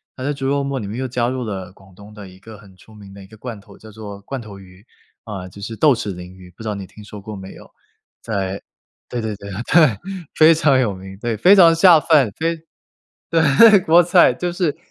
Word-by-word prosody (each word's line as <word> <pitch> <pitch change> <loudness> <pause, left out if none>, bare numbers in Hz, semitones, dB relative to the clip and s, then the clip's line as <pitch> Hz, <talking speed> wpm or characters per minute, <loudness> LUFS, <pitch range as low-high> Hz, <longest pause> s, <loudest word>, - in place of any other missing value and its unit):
她 130 - -8
在 145 - -1
猪 135 -2 -4
肉 140 0 0
末 140 -1 -3
里 105 - -6
面 105 +4 -6
又 130 - -3
加 120 -1 -1
入 130 0 -4
了 95 -4 -7
广 95 -1 -21
东 100 +2 -15
的 105 -3 -11
一 95 0 -17
个 110 +1 -13
很 100 -2 -18
出 110 - -19
名 100 -2 -14
的 100 - -12
一 95 - -15
个 110 - -16
罐 115 -1 -8
头， 100 0 -18
叫 110 0 -15
做 100 -2 -10
罐 135 +6 -6
头 105 -3 -11
鱼， 95 +2 -18 0.4
啊， 95 -4 -7
就 100 - -14
是 110 +3 -6
豆 150 +4 +4
豉 105 -5 -4
鲮 90 0 -9
鱼， 90 -1 -15
不 110 - -14
知 110 - -4
道 105 - -3
你 100 -1 -8
听 105 +2 -15
说 105 0 -11
过 105 0 -9
没 95 0 -10
有。 - - -15 0.5
在 100 -3 -4 0.5
对 120 - -4
对 110 -2 -4
对 100 0 -11
对， 105 +5 -5 0.7
非 160 +1 +6
常 150 -4 +2
有 115 -6 0
名， 95 +1 -11
对， 120 -1 -3
非 185 - +6
常 170 -4 +6
下 165 -1 +6
饭， 145 -9 +2
非 165 +1 -1 0.7
对， 165 +7 +5
国 175 0 +4
菜， 175 -5 +4
就 175 +7 -3
是 175 -5 -2
110 Hz, 260 characters per minute, -19 LUFS, 100-140 Hz, 0.7 s, 非